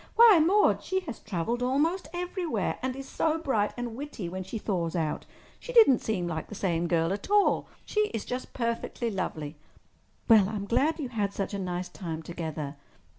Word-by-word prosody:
Why, 450 -6 +8
Maude, 405 +6 +4
she 380 0 -1
has 285 -11 -7
travelled 215 +5 -2
almost 295 +7 +1
everywhere—and 335 - -2
is 270 0 -7
so 320 0 0
bright 265 -10 0
and 240 -2 -4
witty 265 -9 -5
when 185 +2 -5
she 190 +5 -5
thaws 180 -5 -2
out. 160 -3 -2 0.3
She - - -7
didn't 440 - +7
seem 195 -5 -1
like 160 -2 -4
the 210 - -8
same 175 -3 0
girl 165 +1 +2
at 200 - -6
all. 415 -1 +3 0.2
She 425 0 +1
is 225 - -4
just 250 +1 -4
perfectly 235 0 -2
lovely!" 155 -6 -4 0.7
"Well, 215 -4 +6
I'm 210 -2 -3
glad 295 +9 +2
you 270 -5 -3
had 205 -4 -1
such 200 +1 -3
a 200 - -2
nice 180 -1 -3
time 165 -3 -6
together. 155 -4 -5
220 Hz, 180 wpm, -28 LUFS, 180-295 Hz, 0.7 s, Why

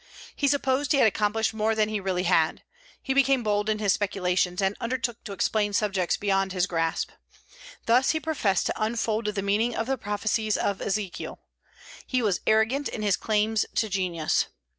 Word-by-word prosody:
He 285 - +1
supposed 280 +1 +1
he - - +3
had 265 - +5
accomplished 220 +1 0
more 220 0 0
than 215 -1 +2
he 215 -1 -2
really 185 -2 -1
had. 165 -3 +2 0.4
He 265 - 0
became 270 -2 +3
bold 210 0 0
in 215 - +1
his 205 -3 +2
speculations, 180 -3 0
and 195 0 +1
undertook 240 -1 -3
to 210 - -6
explain 205 +1 0
subjects 195 -4 0
beyond 195 -2 0
his 180 -1 +1
grasp. 165 -3 -1 0.7
Thus 245 +3 +4
he 315 - +2
professed 275 - 0
to - - -2
unfold 225 0 -1
the 210 -2 -2
meaning 215 +4 +1
of 225 - -1
the 265 0 -2
prophecies 215 +1 -1
of 200 -1 -1
Ezekiel. 200 -2 -3 0.7
He 255 -2 0
was 200 -4 +1
arrogant 220 +6 +2
in 215 - -5
his 205 -2 +3
claims 215 0 +1
to 220 - +1
genius. 180 -5 0
210 Hz, 180 wpm, -26 LUFS, 195-230 Hz, 0.7 s, had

